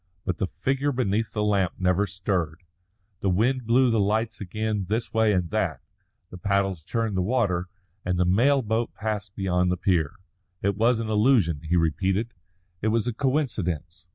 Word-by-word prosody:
But 90 -4 -1
the 95 - 0
figure 135 +7 -1
beneath 115 -4 0
the 105 - -1
lamp 100 -4 +1
never 90 +2 +2
stirred. 90 -3 -2 0.6
The 100 - 0
wind 115 +6 +1
blew 125 +1 +4
the 115 - +2
lights 110 +3 0
again 105 +1 -2
this 115 +2 -2
way 110 -1 +3
and 90 -4 0
that, - - 0 0.5
the 90 - -9
paddles 100 -4 0
churned 115 +4 -2
the 95 - +1
water, 95 -4 0 0.3
the 90 0 +1
mail 130 +9 +3
boat 110 +2 -1
passed 105 -2 -4
beyond 90 -2 +1
the 90 - 0
pier. 85 -5 +1 0.5
It 100 0 +1
was 115 +3 +3
an 115 -1 -3
illusion, 105 - +3
he 85 +3 0
repeated; 95 +7 0 0.5
it 110 - 0
was 110 0 +1
a 120 - -1
coincidence. 95 - -2
100 Hz, 170 wpm, -25 LUFS, 90-115 Hz, 0.6 s, blew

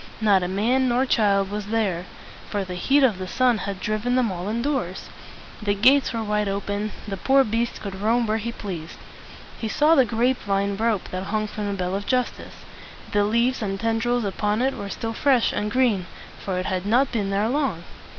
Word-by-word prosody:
Not 205 -4 +4
a 180 - -1
man 240 +8 +1
nor 245 +2 +2
child 200 -5 +2
was 205 -1 -4
there, 200 -6 -1 0.4
for 205 -1 -1
the 185 - -6
heat 270 +11 +2
of 220 -8 +3
the 185 - -4
sun 245 +2 +2
had 195 0 -4
driven 215 +4 -1
them 245 -5 +2
all 180 +1 -5
indoors. 235 -5 -2 0.5
The 205 -1 0
gates 260 +7 +4
were 230 -2 -2
wide 210 -1 0
open; 200 +1 -2 0.2
the 195 -1 -4
poor 270 +7 +4
beast 230 +1 -1
could 195 -2 -6
roam 230 +3 +2
where 220 0 0
he 235 +2 -3
pleased. 175 -8 -7 0.6
He 225 - -3
saw 300 +8 +3
the 275 -5 +6
grape 245 +2 +1
vine 200 0 0
rope 220 -2 0
that 185 +1 -4
hung 215 +1 -1
from 210 0 -5
the 200 - -1
bell 185 -1 -2
of 200 +1 -3
justice. 255 -1 -2 0.5
The 205 -1 +3
leaves 235 +4 +1
and 195 -2 -2
tendrils 230 +1 0
upon 210 +3 0
it 270 +1 +1
were 200 - -6
still 225 +3 -4
fresh 260 -1 +2
and 210 - -1
green, 215 -7 +1 0.4
for 190 -2 -2
it 185 - -2
had 185 +1 -2
not 250 +5 +3
been 210 -5 -1
there 200 +2 +1
long. 260 - -1
215 Hz, 205 wpm, -24 LUFS, 195-240 Hz, 0.6 s, the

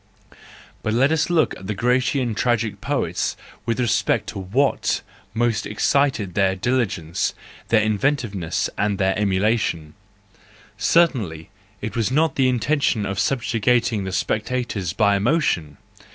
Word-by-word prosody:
Let 120 +7 +2
us 160 -1 +2
but 175 - -2
look 160 - +2
at 95 - -10
the 105 - -2
Grecian 125 +2 +1
tragic 110 -3 0
poets - - -1 0.3
with 115 +1 0
respect 120 -3 +1
to - - -6
what 120 +10 0 0.3
most 115 -2 0
excited 110 -3 +1
their 95 -1 +2
diligence, 95 -7 -1 0.3
their 110 -2 +3
inventiveness, 110 - 0
and 105 -1 +1
their 95 0 +1
emulation,—certainly 100 - -1 0.3
it 105 - -5
was 115 -1 +1
not 155 +2 +2
the 130 -2 +2
intention 125 -3 +1
of 100 0 -3
subjugating 115 -1 +1
the 95 - -4
spectators 110 -2 -2
by 100 -1 +3
emotion! 100 - 0
110 Hz, 125 wpm, -22 LUFS, 100-125 Hz, 0.3 s, their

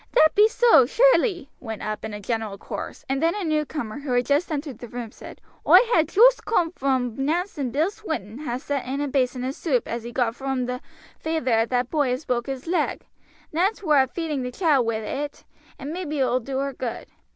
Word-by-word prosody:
"That 315 -10 +6
be 420 +1 +6
so, 450 - +5
surely," 415 - +3
went 225 -3 -6
up 215 0 -4
in 220 - -4
a 210 - -6
general 220 -1 -3
chorus, - - -7
and 270 +1 -1
then 330 +3 +2
a 415 - -3
newcomer 300 -7 -2
who 280 -3 -3
had 245 0 +2
just 290 +6 +1
entered 285 -5 -4
the 240 - -8
room 235 -1 -6
said: - - -12 0.3
"Oi - - +9 0.2
ha' 325 - +5
joost 465 +10 +5
coom 340 -7 +1
vrom 260 -4 0
Nance's 345 +4 -1
and 260 -4 -1
Bill 315 +9 +1
Swinton 310 - -5
ha' 250 -5 -3
sent 280 -2 -3
in 270 +2 -2
a 290 - -1
basin 255 -2 0
o' 260 - -1
soup 275 -4 -1
as 235 +1 -3
he 235 +1 -7
got 235 -2 0
vrom 265 -1 -2
the 250 0 -4 0.4
feyther 315 -6 -1
o' 225 - +3
that 250 0 -1
boy 290 -5 +1
as 255 +5 -3
broke 240 0 -1
his 270 -1 -5
leg. 350 +2 -1 0.5
Nance 390 +6 0
war 300 -5 +5
a 265 - +1
feeding 305 -1 -3
the 250 0 -4
child 285 -6 +2
wi' 230 - 0
it, 275 +7 -4 0.3
and 285 +3 -6
maybe 330 -4 -4
it 265 - +3
will 250 +1 +1
do 265 +2 -5
her 275 0 -2
good. 240 -3 -5
270 Hz, 225 wpm, -24 LUFS, 245-315 Hz, 0.5 s, Oi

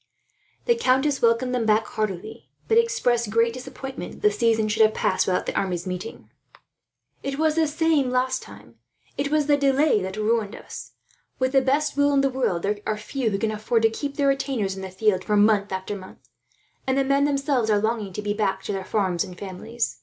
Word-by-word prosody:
The 475 - +4
countess 275 - +1
welcomed 235 +2 +2
them 235 -3 0
back 215 +1 +3
heartily, 215 -1 -5 0.2
but 455 0 +5
expressed 250 - +1
great 230 +1 +2
disappointment 260 +1 -7
that - - -14
the 420 - +5
season 225 - +2
should 215 +1 0
have 215 0 +5
passed 185 - +1
without 180 -1 0
the - - -4
armies 180 -2 -1
meeting. 185 +4 -6 0.9
"It 275 0 -4
was 315 0 +2
the 320 0 +2
same 300 -3 +1
last 255 +1 0
time. - - -14 0.4
It 280 0 -1
was 305 0 +2
the 290 0 +3
delay 275 -4 +3
that 190 +2 -5
ruined 215 -1 0
us. - - -10 0.4
With 260 0 0
the 270 -1 +4
best 285 +3 +1
will 285 0 +3
in 275 - +4
the 275 0 +1
world, 245 -10 -1
there 205 +1 -1
are 215 - 0
few 230 +3 -2
who 200 - -1
can 220 +1 -1
afford 220 +2 0
to 225 - +4
keep 280 +5 -4
their 280 -2 +3
retainers 265 -8 -1
in 190 - -7
the 190 - -6
field 185 0 +1
for 210 - +1
month 205 -1 +3
after 190 +2 -3
month; 185 -1 -12 0.6
and 260 0 +1
the 275 - +3
men, 275 +1 +2
themselves, 275 -5 0
are 210 - +4
longing 215 -1 -1
to 210 - -5
be 205 0 -1
back 205 -2 -1
to - - -4
their 190 -1 -3
farms 185 -3 0
and 180 -3 -10
families. 220 +5 -4
230 Hz, 215 wpm, -24 LUFS, 205-275 Hz, 0.9 s, but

